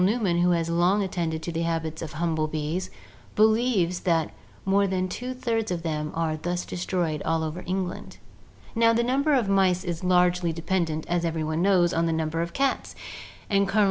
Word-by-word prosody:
Newman, 195 -4 +2
who 175 +1 +3
has 170 -2 +1
long 175 +4 +2
attended 165 -4 -2
to 170 - -3
the 165 0 -2
habits 160 -1 -2
of 160 -2 -6
humble 160 -1 0
bees, 155 +4 -3 0.5
believes 215 -5 +3
that 165 -4 +1 0.3
'more 200 +1 +3
than 185 -1 -1
two 245 +7 -5
thirds 225 -3 -1
of 175 -2 -3
them 150 -2 -2
are 160 -1 -1
thus 175 +3 -3
destroyed 175 -4 -2
all 160 0 0
over 160 +3 -4
England/ 185 0 -4 0.6
Now 230 0 +4
the 235 +1 +2
number 275 +4 +2
of 240 -6 +1
mice 190 -2 +3
is 175 -2 -4
largely 180 -1 +3
dependent, 165 -1 -1
as 175 0 0
every 165 -1 -1
one 155 +1 -1
knows, 180 -3 +3
on 165 0 +1
the 165 - +1
number 160 0 -1
of 170 0 -3
cats; 275 0 -1 0.5
and 200 -1 +2
Col. 205 +2 +1
175 Hz, 190 wpm, -26 LUFS, 165-195 Hz, 0.6 s, Now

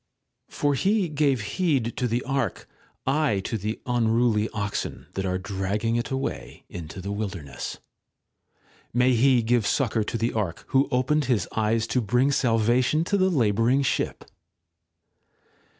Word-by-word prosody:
For 145 0 0
he 195 +6 +2
gave 140 -5 +1
heed 130 - 0
to 125 - 0
the 120 +1 -1
Ark, 135 -2 -2 0.4
I 135 -7 +2
to 115 - -4
the 105 +1 -3
unruly 115 -2 +2
oxen 105 -1 -4
that 95 0 -2
are 90 0 0
dragging 100 +4 -2
it 120 - -1
away 130 - -4
into 85 +1 -7
the 100 +2 -4
wilderness. 95 -8 -5 1.2
May 125 +1 +4
He 125 0 +4
give 115 -1 +2
succour 115 -5 +1
to 115 - -2
the 115 +2 -1
Ark, 100 -6 -2
who 135 +1 +3
opened 140 +3 +1
his 115 -9 +1
eyes 110 +1 +1
to 125 +2 0
bring 125 +6 +2
salvation 120 +4 +2
to 200 - 0
the 190 -1 +3
labouring 120 - +2
ship 135 - -1
120 Hz, 145 wpm, -25 LUFS, 105-135 Hz, 1.2 s, May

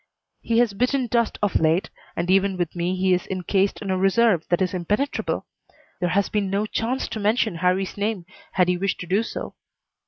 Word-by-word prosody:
He 230 - 0
has 235 -3 +3
bitten 250 +5 +1
dust 235 -1 0
of 205 - +2
late 160 +3 +1 0.2
and 175 +2 0
even 195 0 +3
with 175 -1 -2
me 175 +2 -1
he 185 0 +2
is 180 - -1
incased 190 +2 0
in 195 - -2
a 185 - 0
reserve 195 -2 +3
that 175 - +2
is 185 -1 0
impenetrable. 205 +10 -1 0.5
There 175 -1 0
has 200 +3 +2
been 205 -2 -1
no 200 +2 0
chance 235 +4 -2
to 220 - -4
mention 215 -2 +1
Harrie's 185 +3 0
name 205 -3 -2 0.3
had 180 -2 +3
he 180 0 +1
wished 195 +1 -1
to - - -5
do 190 +5 +2
so. 230 - -6
195 Hz, 205 wpm, -23 LUFS, 180-215 Hz, 0.5 s, has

